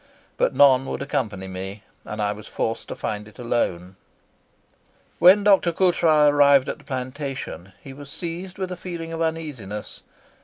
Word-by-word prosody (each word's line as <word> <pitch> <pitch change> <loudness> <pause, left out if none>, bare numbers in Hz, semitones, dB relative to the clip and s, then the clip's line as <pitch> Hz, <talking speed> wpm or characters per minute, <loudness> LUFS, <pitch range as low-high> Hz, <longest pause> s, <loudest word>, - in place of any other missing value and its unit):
But - - +1
none 135 -2 +5
would - - -3
accompany 105 -9 -3
me, 95 +2 -7 0.2
and 105 0 -4
I 105 - +1
was 105 0 -10
forced 115 - -3
to - - -6
find 105 0 -4
it 110 - -17
alone." 95 -7 -2 1.2
When 185 +4 +7
Dr. 195 -4 +4
Coutras 165 -4 +4
arrived 140 -2 +5
at - - -4
the - - -19
plantation 130 - -5
he 135 - -9
was 140 +1 -11
seized 175 +2 -6
with 190 -1 -4
a - - -3
feeling 170 -2 -6
of 165 - -4
uneasiness. 150 -11 -4
140 Hz, 160 wpm, -23 LUFS, 105-165 Hz, 1.2 s, When